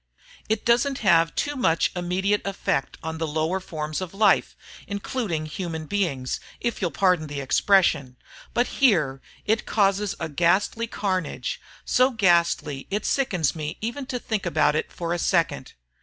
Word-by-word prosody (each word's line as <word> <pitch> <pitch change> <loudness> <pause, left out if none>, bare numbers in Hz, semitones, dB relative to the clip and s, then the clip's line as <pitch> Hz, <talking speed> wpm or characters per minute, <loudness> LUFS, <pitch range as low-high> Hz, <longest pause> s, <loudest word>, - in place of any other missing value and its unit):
It 220 -1 0
doesn't 245 +3 +3
have 165 -3 +4
too 290 0 -1
much 165 -11 +2
immediate 185 +3 0
effect 195 -8 -2
on 160 0 -4
the 160 - -1
lower 160 +5 0
forms 155 -2 -4
of 185 0 -6
life 205 -1 +3 0.3
including 200 -5 -3
human 160 0 -5
beings, 150 -9 -1 0.2
if 235 -2 -2
you'll 180 - +1
pardon 180 -4 +2
the 145 -1 -5
expression. 140 -2 +2 0.4
But 245 - +3 0.2
here, 155 - +3 0.2
it 220 +1 0
causes 200 -1 +1
a 165 - -2
ghastly 185 +9 +1
carnage, 185 - -2 0.2
so 255 +1 +4
ghastly 170 - +1
it 205 +2 -2
sickens 185 - +1
me 155 +1 -4
even 240 +5 -4
to 250 - -2
think 220 -4 -3
about 155 -3 +2
it 155 - -2
for 170 -1 -3
a 175 - -2
second. 170 -7 0
180 Hz, 155 wpm, -25 LUFS, 155-210 Hz, 0.4 s, have